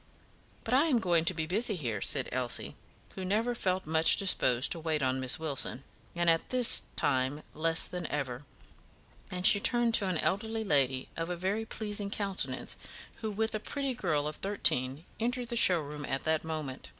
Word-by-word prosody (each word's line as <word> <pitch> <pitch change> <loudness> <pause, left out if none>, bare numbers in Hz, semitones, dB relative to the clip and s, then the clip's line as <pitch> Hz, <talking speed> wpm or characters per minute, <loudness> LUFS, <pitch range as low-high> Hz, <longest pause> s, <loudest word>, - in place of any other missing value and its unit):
"But 225 - -3
I 275 +5 +4
am 290 -7 +2
going 175 -6 +1
to 185 - +2
be 160 -1 -2
busy 210 +5 0
here," 115 - -4
said 135 -3 +2
Elsie, 125 -2 0 0.4
who 190 - -7
never 220 +6 0
felt 190 -5 -2
much 160 +1 +4
disposed 130 -10 +3
to 170 - +2
wait 155 -3 -2
on 130 0 0
Miss 130 -1 0
Wilson, 140 -4 -2 0.3
and 175 0 -1
at 165 -1 +2
this 250 -2 +5
time 130 +3 0
less 165 +1 +1
than 180 -2 -6
ever; 135 -3 -4 0.9
and 180 0 -2
she 205 - +7
turned 240 +2 +2
to 205 -4 +5
an 185 -3 0
elderly 220 +6 -1
lady, 135 -8 0
of 165 +1 -4
a 180 - -2
very 195 +5 -2
pleasing 210 -2 -4
countenance, 200 -2 -3 0.4
who, 220 - -4
with 220 +2 -2
a 215 - -2
pretty 275 +4 -4
girl 155 -10 -1
of 150 - -6
thirteen, 145 -7 +1
entered 245 +1 -2
the 240 - -4
showroom 150 -9 +4
at 135 0 -3
that 160 0 -1
moment. 155 -5 -6
175 Hz, 185 wpm, -30 LUFS, 145-215 Hz, 0.9 s, she